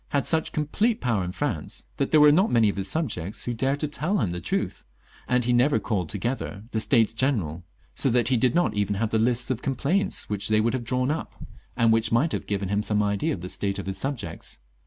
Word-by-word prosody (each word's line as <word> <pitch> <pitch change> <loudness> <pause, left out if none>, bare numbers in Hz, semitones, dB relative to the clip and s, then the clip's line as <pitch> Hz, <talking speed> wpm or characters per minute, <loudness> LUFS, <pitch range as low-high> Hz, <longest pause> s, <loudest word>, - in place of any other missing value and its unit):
had 140 -2 0
such 160 -1 0
complete 205 +10 0
power 115 -6 0
in 90 - -4
France 95 - -4
that 140 - 0
there 155 - +5
were 150 0 +8
not 190 +8 +3
many 115 -3 +4
of - - -3
his 100 -1 -2
subjects 110 - -2
who 120 - -2
dared 135 +4 0
to 150 - -1
tell 170 +7 -1
him 90 - 0
the 90 0 -4
truth, - - -2 0.4
and 125 0 +2
Ke 120 - -3
never 125 +4 +4
called 95 -8 -2
together 105 -1 -3
the 110 - 0
States 115 -1 +3
General, 105 - -1 0.3
so 135 - +2
that 120 -1 +2
he 130 - +3
did 125 +1 +2
not 175 0 +2
even 105 0 0
have 110 +2 -1
the 110 - +2
lists 120 +2 +1
of 125 -1 -2
com 135 -2 -2
plaints 180 +10 0
which 100 -1 -2
they 110 0 +3
would 115 +2 +1
have 130 -2 -2
drawn 125 +3 0
up, 160 - -4 0.4
and 115 -1 +4
which 115 0 +1
might 135 +8 +2
have - - -3
given 100 -1 -2
him 100 +1 +1
some 105 -1 +1
idea 100 -1 0
of 90 - -4
the 90 - -5
state 100 +1 -2
of 100 - -5
his 95 0 -4
sub 135 +3 -2
jects. 85 -8 -7
115 Hz, 250 wpm, -25 LUFS, 100-135 Hz, 0.4 s, were